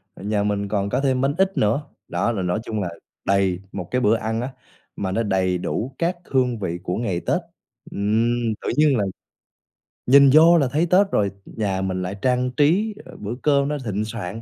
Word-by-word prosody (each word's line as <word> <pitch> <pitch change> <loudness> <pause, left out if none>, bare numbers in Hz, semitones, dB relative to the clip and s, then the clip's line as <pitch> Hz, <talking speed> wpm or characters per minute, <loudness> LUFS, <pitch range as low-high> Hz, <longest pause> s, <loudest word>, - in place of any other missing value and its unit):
nhà 105 +1 -1
mình 100 -1 -1
còn 100 -1 -1
có 135 - 0
thêm 130 -2 +1
bánh 140 +1 +1
ít 190 0 +1
nữa. 110 +8 +2 0.3
Đó 95 +7 0
là 100 - -2
nói 90 +3 -1
chung 110 -3 -3
là 90 - -2 0.4
đầy 95 -2 +2
một 90 -3 -6
cái 125 - +1
bữa 110 -1 +4
ăn 110 +1 -2
á, 125 - -3 0.5
mà 95 -2 -3
nó 115 +4 0
đầy 95 -3 +1
đủ 110 +8 -3
các 175 +1 0
hương 125 -4 0
vị 85 -3 -3
của 90 +2 -2
ngày 95 -7 -1
Tết. 180 - 0 0.5
Ừm, 115 +3 +1
tự - - -3
nhiên 150 -4 +4
là 105 - +1 1.0
nhìn 140 +2 +7
vô 165 +2 +7
là 140 - +2
thấy 160 +4 +2
Tết 195 +2 +4
rồi, 100 -2 +1
nhà 100 -4 -2
mình 95 -1 -2
lại 90 +2 -4
trang 125 0 +1
trí, 180 +11 +2
ờ, - - -12
bữa 105 +4 -5
cơm 140 -2 +3
nó 150 0 -1
thịnh 105 0 -2
soạn, 110 -1 -6
110 Hz, 210 wpm, -22 LUFS, 100-135 Hz, 1.0 s, nhìn